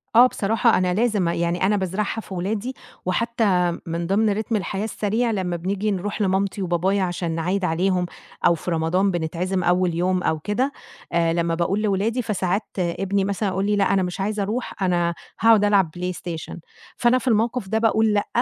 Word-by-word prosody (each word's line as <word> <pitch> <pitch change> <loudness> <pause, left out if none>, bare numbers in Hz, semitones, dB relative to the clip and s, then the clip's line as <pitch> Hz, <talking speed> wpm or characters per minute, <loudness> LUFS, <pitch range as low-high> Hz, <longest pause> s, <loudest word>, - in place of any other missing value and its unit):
آه، 245 +2 +9
بصراحة 225 +1 +2
أنا 180 -1 +1
لازم 210 -4 +1
أ 170 - +1
يعني 170 +2 0
أنا 205 +2 +2
بازرعها 200 +4 -2
في 195 - -10
ولادي، 205 +7 -2 0.3
وحتى 185 -4 +1
من 170 0 -3
ضِمن 210 +3 +2
ريتم 220 +2 -1
الحياة 195 +1 -2
السريع 220 +2 -1
لمّا 185 -4 -1
بنيجي 200 +4 -1
نروح 205 +3 -3
لمامتي 195 +1 0
وبابايا 185 +2 +1
عشان 175 -2 -2
نعيّد 180 +4 -1
عليهم، 180 +2 +1 0.4
أو 170 - +5
في 175 - -5
رمضان 175 +4 +1
بنتعزم 175 +3 -2
أول 175 -1 +2
يوم 180 +1 +1
أو 160 - 0
كده، 225 - -1 0.4
آآ 165 -1 +2
لمّا 170 -1 0
باقول 185 +5 0
لولادي 215 +4 0
فساعات 195 -1 -1 0.2
ابني 190 +3 0
مثلًا 200 0 -1
يقول 190 +1 -1
لي: 210 0 +2
"لأ، 195 -1 +2
أنا 190 -1 +2
مش 180 +2 -4
عايز 210 +2 -1
أروح 210 0 -3
أنا 175 -2 +1 0.3
هاقعُد 225 -2 +5
ألعب 195 -6 +3
PlayStation" 175 -3 -5 0.4
فأنا 240 +1 +4
في 255 - -5
الموقف 230 -1 +1
ده 220 - 0
باقول 220 -1 +3
لأ، 205 -1 +1
195 Hz, 180 wpm, -23 LUFS, 175-210 Hz, 0.4 s, آه